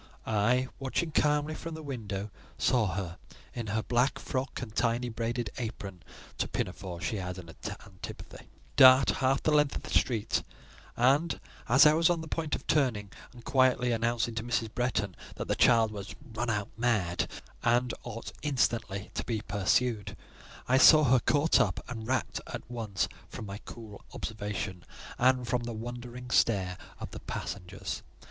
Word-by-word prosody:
I—watching 125 +8 0
calmly 150 0 +2
from 165 +1 -6
the 160 - -8
window—saw 110 -1 -2
her, 90 -3 -4 0.3
in 115 -2 -4
her 110 +2 -1
black 125 +3 +2
frock 130 +1 -3
and 115 -4 -7
tiny 120 +1 +1
braided 115 -1 -2
apron 100 -6 -5 0.4
(to - - +1
pinafores 90 -3 -4
she 110 - -1
had 90 -1 -4
an 85 -2 -9 0.4
antipathy), 95 -2 -10 0.3
dart 130 0 +8
half 135 +1 +2
the 155 - +3
length 150 -1 +3
of - - -5
the - - -8
street; 115 -5 +1 0.6
and, 140 +7 +3 0.3
as 135 +5 +7
I 150 - +8
was 165 +1 +4
on 170 -2 +1
the 160 - -7
point 160 -1 -1
of - - -9
turning, 115 -9 +1 0.2
and 120 -2 -14
quietly 130 -2 +3
announcing 115 0 0
to 110 -1 -3
Mrs. 115 -2 -1
Bretton 105 -7 -1 0.2
that - - -5
the - - +2
child 115 -3 +5
was 100 -2 -7 0.2
run 120 +2 -2
out 105 -2 -1
mad, 100 -7 +1 0.3
and 120 +1 +2
ought 115 -1 -7
instantly 115 -8 0
to - - -2
be 110 -3 -2
pursued, 105 +2 0 0.5
I 130 +1 +4
saw 155 +2 +9
her 130 -2 +5
caught 145 +6 +3
up, - - +1
and 110 -3 -6
rapt 130 -2 -1
at - - -6
once 110 -5 -1 0.2
from 110 - -7
my 100 0 -6
cool 110 -3 -10
observation, 105 -4 -4 0.4
and 125 0 +3
from 125 0 +1
the 120 0 -4
wondering 120 +2 -7
stare 95 -8 +2 0.2
of - - -6
the - - -7
passengers. 95 0 -5
120 Hz, 160 wpm, -30 LUFS, 105-130 Hz, 0.6 s, saw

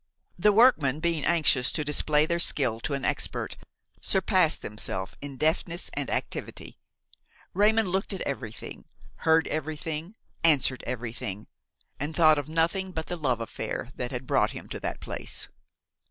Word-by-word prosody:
The 210 +4 +5
workmen, 195 - +4
being 165 -2 0
anxious 155 -7 +3
to 155 - +1
display 150 +1 +3
their 170 +1 -1
skill 125 -9 +3
to 140 +4 -2
an 140 - -3
expert, - - -1 0.5
surpassed 185 -4 +2
themselves 95 -2 -2
in 140 -2 -7
deftness 165 +4 -1
and - - -3
activity. - - -5 0.7
Raymon 220 +2 +4
looked 190 +2 -1
at 195 - -4
everything, 125 -6 -5 0.3
heard 160 0 +3
everything, 155 +4 -4 0.3
answered 135 -6 +3
everything, 115 -4 -4 0.5
and 150 +3 -4
thought 155 -3 +5
of 145 +1 -6
nothing 170 +4 0
but 160 -3 -4
the 175 - -4
love 130 -8 -1
affair 115 +2 -5
that 125 +1 -4
brought - - +2
him - - -10
to - - -5
that - - -4
place. - - -5
155 Hz, 145 wpm, -27 LUFS, 130-170 Hz, 0.7 s, The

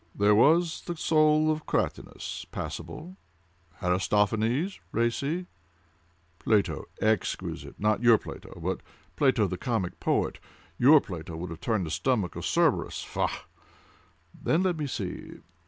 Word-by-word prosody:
"There 105 +1 +4
was 160 +9 +4
the 175 -1 -3
soul 155 0 +4
of 155 0 -4
Cratinus—passable: 180 +4 -4 0.7
Aristophanes—racy: 115 - 0 0.9
Plato—exquisite—not 110 0 0
your 120 -2 +7
Plato, - - -10
but - - -2 0.3
Plato 130 -6 +3
the 90 -1 -4
comic 110 -7 -2
poet; - - 0 0.4
your 140 +4 +7
Plato 85 -3 -7
would 85 +1 -5
have 80 - -8
turned 110 -6 0
the 80 - -5
stomach 110 -4 0
of - - -3
Cerberus—faugh! - - 0 0.9
Then 165 +4 +1
let 180 -3 +1
me 150 -2 -2
see! - - -5
115 Hz, 105 wpm, -28 LUFS, 100-155 Hz, 0.9 s, your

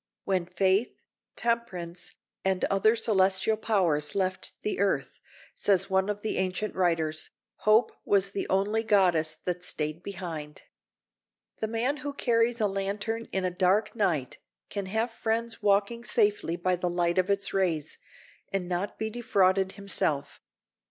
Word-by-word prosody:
"When 185 -3 0
faith, 190 +4 +1 0.4
temperance, 180 -7 -2 0.3
and 190 -1 +1
other 205 +3 +3
celestial 195 -2 +2
powers 175 -9 +1
left 185 -1 -1
the 210 - -2
earth," 200 -1 0 0.3
says 195 -1 +2
one 190 +1 +2
of 205 0 -3
the 220 - -1
ancient 190 +3 -1
writers, 160 -4 +1 0.4
"Hope 215 +3 +5
was 195 -1 +2
the 200 - -3
only 200 +4 +2
goddess 180 -7 +3
that 180 0 -2
stayed 155 -1 -1
behind." 170 -6 -6 1.0
The 220 - -1
man 235 +6 0
who 285 +1 -5
carries 235 -3 +1
a 215 - +2
lantern 205 +3 -2
in 190 -1 -1
a 180 - 0
dark 190 +5 +2
night 170 - 0 0.3
can 200 -2 -3
have 220 +4 -1
friends 225 +1 -2
walking 205 +3 +2
safely 210 -8 +1
by 180 +1 +1
the 180 0 -1
light 175 0 +1
of 185 +1 +1
its 200 0 0
rays, 175 -6 0 0.5
and 195 -2 -1
not 180 +3 -2
be 220 0 -3
defrauded 195 -4 +2
himself. 185 -8 -2
195 Hz, 145 wpm, -28 LUFS, 180-215 Hz, 1.0 s, Hope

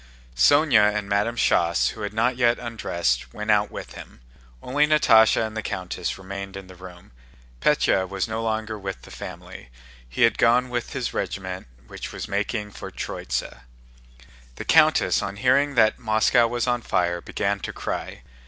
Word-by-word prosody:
Sónya 110 - +4
and 105 -1 -3
Madame 105 +4 0
Schoss, 85 -6 +2
who 110 - -9
had 105 - -3
not 120 +4 +1
yet 120 -1 +2
undressed, 85 - -2
went 105 +1 -1
out 105 0 +3
with - - -8
him. - - -12 0.4
Only 145 +4 +2
Natásha 115 -7 +5
and 110 0 -7
the 110 - -2
countess 90 -3 -4
remained 100 +1 -7
in 95 - -9
the 95 - -13
room. 90 -3 -13 0.5
Pétya 95 -1 +2
was 95 +1 -2
no 110 0 -3
longer 110 -1 -3
with 95 -1 -6
the - - -13
family, - - -9 0.4
he 65 - 0
had 115 - +3
gone 120 +1 +4
on 130 - -12
with 120 -1 -3
his - - -3
regiment 95 -4 -4 0.2
which - - -8
was - - -6
making 105 +1 -2
for - - -8
Tróitsa. - - -5 1.0
The - - -7
countess, - - +4
on 100 0 -4
hearing 140 +6 +2
that 110 -2 +3
Moscow 110 +1 +3
was 120 0 -2
on 120 -1 0
fire, 85 -4 0
began 100 +2 -2
to - - -5
cry. - - -5
105 Hz, 170 wpm, -24 LUFS, 95-115 Hz, 1.0 s, Natásha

